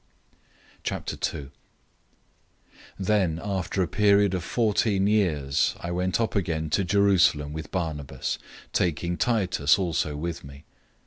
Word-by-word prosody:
002:001 70 Hz, -3 st, -3 dB, 1.5 s
Then 95 Hz, -4 st, +1 dB
after 95 Hz, -1 st, -1 dB
a -, -, -1 dB
period 100 Hz, +2 st, +3 dB
of 90 Hz, -3 st, -2 dB
fourteen 105 Hz, -2 st, +1 dB
years 80 Hz, -10 st, +1 dB
I 85 Hz, -, -5 dB
went 90 Hz, +2 st, 0 dB
up 115 Hz, -1 st, -1 dB
again 80 Hz, -5 st, -1 dB
to 100 Hz, -, +2 dB
Jerusalem 90 Hz, -6 st, +3 dB
with 80 Hz, 0 st, -6 dB
Barnabas, 75 Hz, -7 st, -3 dB, 0.3 s
taking 85 Hz, 0 st, 0 dB
Titus 90 Hz, -11 st, +2 dB
also 85 Hz, -5 st, -1 dB
with 85 Hz, +2 st, -4 dB
me. 70 Hz, +2 st, -12 dB
90 Hz, 115 wpm, -26 LUFS, 80-100 Hz, 1.5 s, period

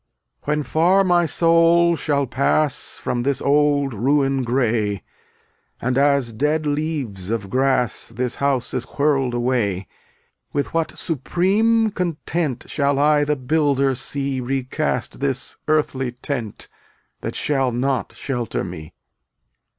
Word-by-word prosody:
250 -, -, -4 dB
When -, -, -2 dB
far 180 Hz, +7 st, +3 dB
my 175 Hz, -2 st, +3 dB
soul 170 Hz, +1 st, +4 dB
shall 145 Hz, -3 st, 0 dB
pass 140 Hz, +3 st, 0 dB
From 120 Hz, -, -2 dB
this 140 Hz, +2 st, 0 dB
bid 145 Hz, -1 st, +2 dB
ruin 135 Hz, +4 st, +1 dB
gray, 115 Hz, -5 st, 0 dB, 0.8 s
And 125 Hz, +1 st, -1 dB
as 140 Hz, -3 st, +2 dB
dead 150 Hz, +6 st, 0 dB
leaves 145 Hz, -, -2 dB
of 110 Hz, -4 st, -3 dB
grass 130 Hz, -2 st, +1 dB
This 125 Hz, +2 st, -3 dB
house 140 Hz, -3 st, 0 dB
is 130 Hz, -2 st, -1 dB
whirled 135 Hz, -3 st, 0 dB
away, 120 Hz, -6 st, 0 dB, 0.7 s
With 145 Hz, -, -2 dB
what 165 Hz, -1 st, -1 dB
supreme 205 Hz, -, +1 dB
content 165 Hz, -, -2 dB
Shall 140 Hz, -1 st, 0 dB
I 150 Hz, +1 st, +4 dB
the 150 Hz, 0 st, +1 dB
Builder 140 Hz, 0 st, +1 dB
see 135 Hz, +1 st, -2 dB
Recast 130 Hz, +1 st, -2 dB
this 135 Hz, -1 st, -1 dB
earthly 135 Hz, -5 st, 0 dB
tent 125 Hz, -4 st, -4 dB, 0.3 s
— -, -, -43 dB
That -, -, -4 dB
shall 135 Hz, -3 st, +1 dB
not 130 Hz, +1 st, -1 dB
shelter 120 Hz, -6 st, -3 dB
me. 85 Hz, -4 st, -8 dB
140 Hz, 125 wpm, -21 LUFS, 125-150 Hz, 0.8 s, soul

